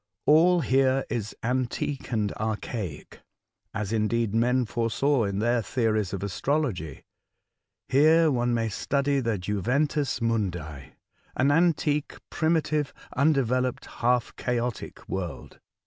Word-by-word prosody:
All 170 +4 +5
here 135 0 +2
is 110 -3 -3
antique 130 +3 -2
and 105 -3 0
archaic, 110 -5 -5 0.5
as, 105 -1 -3
indeed, 110 0 0
men 125 +2 +2
foresaw 120 +3 +1
in 100 -1 -2
their 120 +3 +1
theories 110 -4 0
of 100 -1 -4
astrology. 100 - -2 0.8
Here 155 +3 +5
one 120 -2 +1
may 115 -1 0
study 140 +6 0
the 115 -4 -1
juventus 125 +10 0
nnundi 90 - -3 0.2
— - - -36
an 135 +2 +3
antique, 150 -2 +1 0.2
primitive, 155 -3 0 0.2
undeveloped, 130 -3 +1 0.2
half 120 0 +1
chaotic 120 -2 -3
world." 95 -3 -5
120 Hz, 115 wpm, -26 LUFS, 110-140 Hz, 0.8 s, All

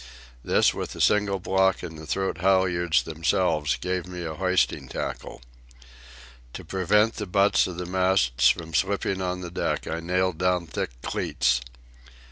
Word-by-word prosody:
This, - - +3
with - - -5
the - - -10
single 100 -2 +2
block 95 0 +1
and 85 -2 -7
the 80 0 -10
throat 95 +2 -2
halyards 90 -3 +2
themselves, 80 -3 0
gave 90 0 -3
me 90 -1 -6
a 80 - -4
hoisting 90 +2 0
tackle. - - -6 1.1
To - - -8
prevent 105 +4 +2
the 105 - -4
butts 100 +2 +3
of 90 -2 -7
the 90 - -4
masts 90 -9 +2
from 80 -1 -2
slipping 95 +2 0
on 90 0 -2
the 85 -1 -7
deck, - - -2
I 80 - -3
nailed 90 0 -1
down 90 -1 +1
thick 80 - -3
cleats. 60 -3 0
90 Hz, 155 wpm, -25 LUFS, 80-95 Hz, 1.1 s, This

